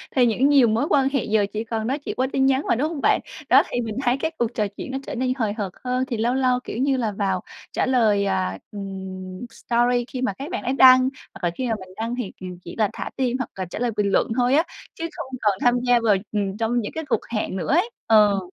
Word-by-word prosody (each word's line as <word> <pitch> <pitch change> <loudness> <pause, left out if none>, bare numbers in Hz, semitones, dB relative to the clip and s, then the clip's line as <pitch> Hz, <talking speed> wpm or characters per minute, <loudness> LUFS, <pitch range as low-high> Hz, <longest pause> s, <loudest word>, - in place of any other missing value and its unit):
thì 250 - +5
những 245 +5 +3
nhiều 275 -4 +6
mối 225 +5 +1
quan 270 -2 +3
hệ 275 -2 0
giờ 210 -1 +2
chỉ 215 - -2
còn 225 -1 -3
nói 275 +4 -1
chuyện - - -5
qua 260 +1 +1
tin 265 - +3
nhắn 270 +1 +3
mà, - - +3
đúng 290 +7 0
hông 310 -4 -5
bạn? - - +3 0.3
Đó, - - +7
thì 245 - -1
mình 220 -2 -4
thấy 245 +2 +2
cái 320 +3 -2
cuộc 240 0 -1
trò 210 -2 0
chuyện - - -6
nó 265 - -2
trở - - -4
nên 255 +1 0
hời 215 -4 0
hợt 205 -4 -4
hơn, 255 +1 0
thì 240 - -3
lâu 235 +3 +1
lâu, 255 -1 +2
kiểu - - -6
như 270 +1 +2
là, 225 -4 0
vào 195 -2 -1 0.3
trả - - 0
lời, 220 -6 +3
à, 95 - -1
ừm, 190 0 -7
story 240 +1 +1
khi 255 -1 -5
mà 255 -6 0
các 280 - -7
bạn 370 - -3
ấy 255 +1 0
đăng, 255 -1 +8 0.3
hoặc 195 - -13
là 175 - +2
khi 260 - -2
mà 225 - +1
mình 185 -1 -11
đăng 230 +2 -2
thì 240 -7 -4
kìm 185 -1 -8
chỉ 170 - -8
là 215 -3 +2
thả - - -5
tim, 255 -1 0
hoặc 255 - -4
là 190 -1 -3
trả 175 - -7
lời 245 -1 0
bình 200 -1 +1
luận - - +3
thôi 245 +1 +3
á, 315 - +4 0.3
chứ 330 - -4
không - - -5
còn 205 -3 +2
tham 245 0 +3
gia 245 -1 +5
vào, 210 -3 +4 0.2
ừm, 200 -2 -2
trong 230 +2 0
những 205 - -5
cái 320 -1 -4
cuộc 270 - 0
hẹn 215 -4 -2
nữa 185 +6 -2
ấy. 365 +9 +3 0.2
Ờ. 210 -3 +5
235 Hz, 275 wpm, -23 LUFS, 205-260 Hz, 0.3 s, đăng